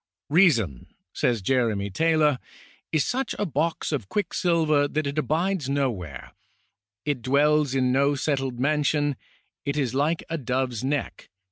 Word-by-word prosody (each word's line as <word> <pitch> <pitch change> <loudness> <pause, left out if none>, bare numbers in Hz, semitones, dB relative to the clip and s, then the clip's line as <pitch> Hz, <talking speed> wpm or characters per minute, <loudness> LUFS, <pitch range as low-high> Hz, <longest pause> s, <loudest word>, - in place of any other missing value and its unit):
" 90 +7 -68
Reason," 120 - +3 0.3
says 115 -5 0
Jeremy 110 -4 +1
Taylor/ 155 +1 +2 0.3
" - - -31
is 155 - +2
such 265 +2 -2
a 205 - 0
box 160 0 -1
of 130 -10 -3
quick 205 -3 -2
silver 155 -5 +2
that 155 +1 -2
it 140 +2 -1
abides 165 0 0
no 140 -2 +1
where; 90 -9 -8 0.7
it 145 -4 -1
dwells 145 +2 +2
in 130 -1 +2
no 140 +2 +3
settled 135 -3 -1
man 150 +3 +2
sion; 145 -1 +1 0.5
it 140 +1 -2
is 130 -5 0
hke 150 +5 0
a 165 -1 -3
dove's 125 -2 -2
neck 140 +2 -3
140 Hz, 160 wpm, -25 LUFS, 125-155 Hz, 0.7 s, Reason